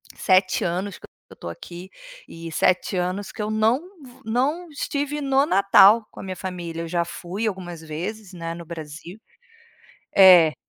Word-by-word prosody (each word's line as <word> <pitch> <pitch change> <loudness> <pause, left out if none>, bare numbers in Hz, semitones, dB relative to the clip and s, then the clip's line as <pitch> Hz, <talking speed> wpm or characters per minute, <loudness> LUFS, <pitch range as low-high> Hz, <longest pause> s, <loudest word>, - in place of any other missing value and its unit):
7 185 0 +2
anos 185 +3 -3
que - - -13 0.3
eu - - -12
tô - - -9
aqui 175 - -10 0.4
e 165 0 -9
7 185 +3 +1
anos 185 +3 -2
que 220 - -7
eu 215 - -3
não 220 +4 +2 0.2
vo 250 -1 -16
não 280 +10 -1
estive 290 0 -3
no 275 0 +2
Natal 200 - +5
com - - -13
a - - -9
minha 185 -1 -5
família. 175 -3 -6
Eu - - -6
já 170 0 -1
fui 190 +6 -4
algumas 175 -4 -5
vezes, 185 +6 -6
né, 165 -1 -5
no 170 -1 -9
Brasil. 165 +4 -9 1.0
É. 180 -5 +8
185 Hz, 170 wpm, -23 LUFS, 170-220 Hz, 1.0 s, É